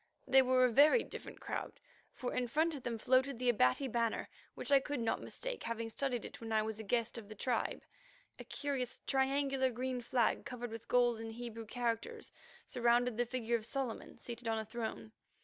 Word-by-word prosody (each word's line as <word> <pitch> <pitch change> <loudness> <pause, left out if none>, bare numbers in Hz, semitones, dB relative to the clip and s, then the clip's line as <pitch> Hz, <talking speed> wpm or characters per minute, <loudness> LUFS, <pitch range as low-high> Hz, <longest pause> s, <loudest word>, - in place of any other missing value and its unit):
They 265 - +7
were 255 0 +4
a 250 - +2
very 300 - +6
different - - -8
crowd, - - -4 0.4
for 250 - -4
in 250 -1 0
front 315 +6 +2
of 285 - -6
them 240 -2 -3
floated 255 +3 +3
the 250 +1 +1
Abati 215 - +3
banner, 235 -2 0 0.3
which - - -3
I 280 - +8
could 290 0 -3
not 225 -1 0
mistake, - - -5
having 230 0 -3
studied 250 -1 -1
it - - -9
when 225 -1 -5
I 215 -1 +3
was 220 0 -4
a - - -4
guest 230 +2 0
of 210 -2 -12
the 215 - -8
tribe: 235 +2 -1 0.6
a - - -6
curious, 275 -4 -3
triangular, 270 0 +2
green 250 +1 -2
flag 240 -1 +1
covered 245 -2 -5
with 225 0 -8
golden 240 -2 +2
Hebrew 230 -1 -7
characters, 245 - -2 0.3
surrounding 240 -1 +2
the 245 0 +1
figure 235 -1 0
of 220 - -9
Solomon 265 -5 -3
seated 240 0 -6
on 225 0 +1
a 220 - -2
throne. 220 -1 -5
245 Hz, 195 wpm, -35 LUFS, 225-265 Hz, 0.6 s, I